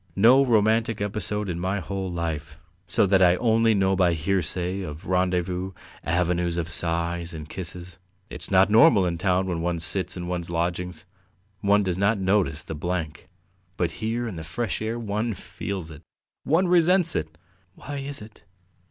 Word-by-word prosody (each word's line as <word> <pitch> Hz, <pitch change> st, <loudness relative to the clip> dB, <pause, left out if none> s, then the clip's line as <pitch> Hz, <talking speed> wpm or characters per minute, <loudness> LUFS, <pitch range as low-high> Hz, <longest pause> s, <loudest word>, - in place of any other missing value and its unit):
No 120 Hz, +7 st, +6 dB
romantic 110 Hz, -1 st, +2 dB
episode 105 Hz, 0 st, -2 dB
in 85 Hz, -2 st, -3 dB
my 95 Hz, +3 st, -1 dB
whole 95 Hz, +1 st, -4 dB
life, 80 Hz, -3 st, -4 dB, 0.3 s
so -, -, +2 dB
that 95 Hz, -1 st, +3 dB
I 90 Hz, -1 st, +6 dB
only 115 Hz, +1 st, +3 dB
know 95 Hz, -1 st, +2 dB
by 90 Hz, -2 st, +3 dB
hearsay 90 Hz, +2 st, -1 dB
of 75 Hz, -3 st, -7 dB
rendezvous, 90 Hz, 0 st, 0 dB, 0.3 s
'avenues 85 Hz, 0 st, 0 dB
of 85 Hz, -1 st, -3 dB
sighs,' 85 Hz, +1 st, 0 dB
and 75 Hz, -1 st, -7 dB
kisses. 90 Hz, 0 st, -7 dB, 0.3 s
It's -, -, -7 dB
not 95 Hz, +1 st, +4 dB
normal! 110 Hz, -3 st, +6 dB
In 85 Hz, -2 st, -2 dB
town, 95 Hz, 0 st, +1 dB
when 90 Hz, -3 st, -2 dB
one 85 Hz, 0 st, -1 dB
sits 90 Hz, +4 st, -2 dB
in 90 Hz, -, -5 dB
one's 90 Hz, -1 st, -3 dB
lodgings, 85 Hz, 0 st, -3 dB, 0.5 s
one 100 Hz, +1 st, +3 dB
does 90 Hz, -1 st, -2 dB
not 100 Hz, +3 st, +2 dB
notice 95 Hz, -4 st, +1 dB
the -, -, -6 dB
blank, 80 Hz, 0 st, -4 dB, 0.5 s
but 90 Hz, -, 0 dB
here 115 Hz, +2 st, -1 dB
in 100 Hz, -6 st, -6 dB
the 80 Hz, -, -6 dB
fresh 110 Hz, +6 st, -3 dB
air 110 Hz, +2 st, -2 dB
one 110 Hz, 0 st, -2 dB
feels 95 Hz, -3 st, -6 dB
it.... 75 Hz, 0 st, -11 dB, 0.4 s
One 170 Hz, +6 st, +3 dB
resents 175 Hz, 0 st, +4 dB
it!" 80 Hz, +1 st, -3 dB, 0.4 s
"Why 145 Hz, +1 st, -7 dB
is 140 Hz, -3 st, -3 dB
it?" 110 Hz, +1 st, -15 dB
95 Hz, 170 wpm, -25 LUFS, 85-105 Hz, 0.5 s, No